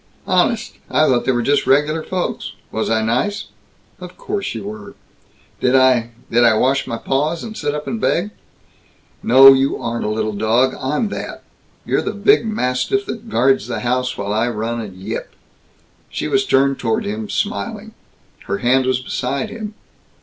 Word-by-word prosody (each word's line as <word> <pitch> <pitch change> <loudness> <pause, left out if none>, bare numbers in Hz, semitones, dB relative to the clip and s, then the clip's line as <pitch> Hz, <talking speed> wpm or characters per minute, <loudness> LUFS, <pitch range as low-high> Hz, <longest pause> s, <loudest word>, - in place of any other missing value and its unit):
"Honest? 195 +4 +1
I 155 - +3
thought 125 -4 +2
they - - +3
were 120 -2 0
just 145 +4 +1
regular 150 +4 +3
folks. 180 +2 -3 0.2
Was 110 - -2
I 110 -1 +1
nice?" 125 - -1 0.5
"Of 180 0 -10
course 200 - -3
you 110 - -5
were." 105 0 -8 0.6
"Did 125 +1 +2
I 130 -3 +4 0.2
did 120 +1 +4
I 115 -2 +5
wash 135 +5 +1
my 115 - -3
paws 150 +7 -1
and 220 -1 -7
sit 145 -4 -2
up 150 - -5
and 225 -1 -4
beg?" 195 +3 +1 0.9
"No, 135 +2 +8
you 135 +1 +1
aren't 115 0 -3
a 105 - -1
little 110 0 -1
dog. 110 +5 +2
I'm 150 - 0
that. - - -6 0.4
You're - - +1
the - - -3
big 415 - +3
mastiff 215 - 0
that 230 0 -7
guards 135 - +2
the - - -3
house, 125 +1 -1
while 100 0 -2
I 110 +3 +1
run 115 +1 -3
and 100 -4 -8
yip." 100 +5 -6 0.7
She - - -3
was 400 0 +1
turned 135 0 +2
toward 220 0 -1
him, 210 +1 -4
smiling. 220 +1 -3 0.5
Her 100 - -2
hand 130 +3 +2
was 130 -1 +1
beside 130 +1 -3
him. 215 -1 -7
135 Hz, 175 wpm, -19 LUFS, 115-195 Hz, 0.9 s, No